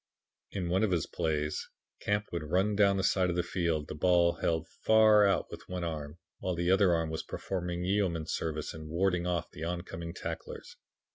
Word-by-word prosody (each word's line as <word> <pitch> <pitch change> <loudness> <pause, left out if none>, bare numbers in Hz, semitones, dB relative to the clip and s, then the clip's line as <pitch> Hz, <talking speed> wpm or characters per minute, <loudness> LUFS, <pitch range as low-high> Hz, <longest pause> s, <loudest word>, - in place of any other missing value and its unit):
"In 95 -3 -3
one 95 +2 +2
of 110 - +3
his 85 -5 +1
plays, 75 -1 -2 0.3
Camp 105 +1 0
would 85 - -2
run 95 +7 +1
down 100 -1 +4
the 95 - 0
side 95 -1 +2
of 85 - -1
the 90 - +1
field, 85 -5 -1
the - - -5
ball 85 +2 +3
held 80 -1 0
far 110 +2 +5
out 95 - 0
with - - -10
one 90 -1 -3
arm, 75 -2 -4 0.2
while 90 -1 -2
the 85 +1 +1
other 95 -2 +5
arm 80 -1 -1
was 80 - -2
performing 90 -2 -4
yeoman 90 -5 0
service 80 -1 -3
in 80 -1 -9
warding 90 +1 +1
off 85 -1 -2
the 85 - -8
oncoming 85 -1 -4
tacklers. - - -7
85 Hz, 195 wpm, -31 LUFS, 80-95 Hz, 0.3 s, far